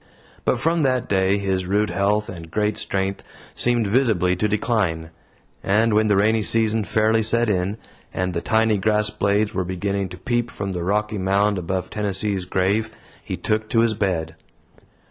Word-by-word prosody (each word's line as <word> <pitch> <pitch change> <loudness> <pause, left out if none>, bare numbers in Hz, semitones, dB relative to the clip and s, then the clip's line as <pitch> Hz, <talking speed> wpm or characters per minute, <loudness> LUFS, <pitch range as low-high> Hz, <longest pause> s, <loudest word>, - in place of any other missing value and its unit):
But 125 - +1
from 165 +5 +1
that 130 -3 +1
day 95 0 +2
his 95 -2 -1
rude 105 +2 +1
health 105 +2 +1
and 85 -3 -9
great 105 +3 0
strength 95 0 -2 0.3
seemed 120 -2 +1
visibly 100 -5 +2
to 105 - +1
decline; 100 -7 -1 0.5
and 110 +3 +2
when 110 +1 +3
the 105 - +3
rainy 110 +3 +3
season 110 +2 +2
fairly 110 +2 +2
set 115 +2 +2
in, 95 +1 -1 0.3
and 90 0 -2
the 85 - -2
tiny 110 -1 +2
grass 105 +2 +1
blades 100 +1 0
were 95 - -1
beginning 95 +1 -2
to 90 - -9
peep 120 +4 -1
from 100 -1 -5
the 90 -2 -3
rocky 105 +3 -1
mound 100 +1 +1
above 90 +1 -3
Tennessee's 100 -2 -2
grave, 100 +4 0 0.3
he - - -5
took 110 0 -1
to 115 - +3
his 115 -1 +2
bed. 90 -6 -2
105 Hz, 170 wpm, -22 LUFS, 95-110 Hz, 0.5 s, when